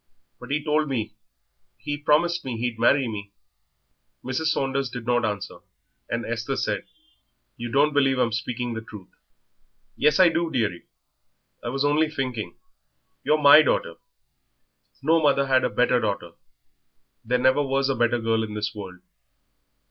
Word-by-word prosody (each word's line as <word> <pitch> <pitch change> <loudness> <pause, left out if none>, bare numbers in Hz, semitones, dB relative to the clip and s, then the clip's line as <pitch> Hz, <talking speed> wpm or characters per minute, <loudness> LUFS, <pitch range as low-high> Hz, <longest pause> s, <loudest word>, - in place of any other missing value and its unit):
But - - -11
he 145 +1 -1
told 150 0 +1
me 110 -5 -3 0.6
he 145 - -4
promised 160 +4 +1
me 125 -3 -4
he'd 115 -1 -3
marry 130 +3 +3
me." 100 -2 -7 0.9
Mrs. 130 +5 -1
Saunders 135 -3 0
did 120 -1 -7
not 120 0 +1
answer, 105 -3 -4 0.5
and 115 0 -2
Esther 115 +4 -3
said, - - -2 0.7
"You 120 0 -6
don't 145 +3 +3
believe 135 -2 +2
I'm 125 -2 +1
speaking 120 +2 -3
the 110 - -5
truth." 105 -4 -12 0.9
"Yes, 150 +2 +2
I 185 -2 +7
do, 165 0 -1
dearie. 110 - -2 0.8
I 120 - -3
was 135 +3 -1
only 150 +2 +2
thinking. 125 - -4 0.7
You're 155 - +2
my 145 +2 +9
daughter; 140 - 0 1.1
no 160 +3 +3
mother 140 -2 +3
had 130 -1 +3
a - - +1
better 125 +3 +2
daughter. 100 -6 -3 0.9
There 125 +2 +1
never 130 +3 +3
was 135 -1 0
a 135 - +1
better 120 0 +2
girl 115 -1 0
in 105 -1 -6
this 105 0 -3
world." 95 -4 -9
125 Hz, 155 wpm, -24 LUFS, 115-145 Hz, 1.1 s, my